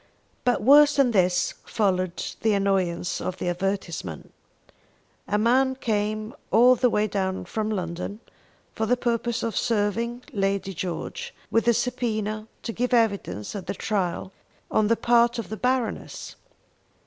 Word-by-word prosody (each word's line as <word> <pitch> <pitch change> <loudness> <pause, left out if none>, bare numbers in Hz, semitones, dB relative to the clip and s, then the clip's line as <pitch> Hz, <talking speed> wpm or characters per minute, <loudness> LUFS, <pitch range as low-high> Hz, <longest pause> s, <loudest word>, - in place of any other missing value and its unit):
But 245 -3 +1
worse 290 +4 +7
than 275 -3 +4
this 180 -4 +2
followed 185 -5 -1
the 220 -1 +3
annoyance 190 -3 0
of 185 - -3
the 175 - -2
advertisement. 175 - -3 0.9
A 210 - +1
man 260 +4 +3
came 215 -1 -2 0.2
all 245 +5 +6
the 250 0 +2
way 210 -2 +2
down 190 -3 -2
from 215 +4 -2
London 185 0 -4 0.5
for 220 - -1
the 250 +2 +3
purpose 235 -1 -1
of 230 - -2
serving 230 +2 0
Lady 195 -1 -1
George 190 - -5 0.2
with 230 +1 +2
a 235 - +6
subpoena 220 -3 -2 0.2
to 230 - -4
give 250 +2 +1
evidence 200 - 0
at 195 -3 -6
the - - -3
trial 190 -1 -2 0.4
on 215 - +3
the 230 +1 +3
part 235 0 +3
of 230 -5 -5
the 220 - -3
Baroness. 250 -1 -2
215 Hz, 145 wpm, -25 LUFS, 190-240 Hz, 0.9 s, worse